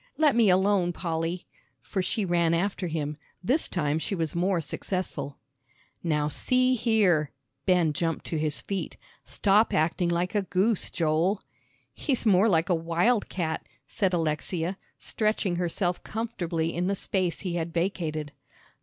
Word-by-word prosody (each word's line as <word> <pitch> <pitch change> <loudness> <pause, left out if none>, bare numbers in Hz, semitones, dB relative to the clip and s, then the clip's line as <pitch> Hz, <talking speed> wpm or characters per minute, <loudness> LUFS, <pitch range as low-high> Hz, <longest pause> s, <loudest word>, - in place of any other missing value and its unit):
Let 300 -4 +4
me 230 -4 +5
alone, 185 -1 +3
Polly," 165 0 -3 0.3
for 190 - -3
she 210 +3 -1
ran 170 -2 +2
after 185 +1 -1
him; 150 -2 -3 0.3
this 265 - +2
time 155 -3 0
she 195 - -2
was 165 -4 -2
more 180 +1 +1
successful. 165 -2 -3 0.6
"Now 150 -3 +1
see 255 - +2
here," 205 - +3 0.4
Ben 175 -4 +3
jumped 165 +1 -2
to 160 - -2
his 155 -1 0
feet, 195 -2 -4 0.3
"stop 210 +2 +2
acting 170 +3 +1
like 175 +3 0
a 205 - +2
goose, 195 +2 +1
Joel." 165 +5 +1 0.5
"He's 260 -5 -1
more 205 +1 +5
like 165 -2 +3
a - - +4
wild 170 +8 +1
cat," 160 -4 -2 0.2
said 195 -3 0
Alexia, 165 +2 -1 0.2
stretching 215 -4 -1
herself 175 +1 -1
comfortably 175 -8 -2
in 175 +1 -1
the 200 - +1
space 185 -3 -1
he 180 -3 -3
had 170 -1 -2
vacated. 165 -4 -2
175 Hz, 145 wpm, -27 LUFS, 165-200 Hz, 0.6 s, me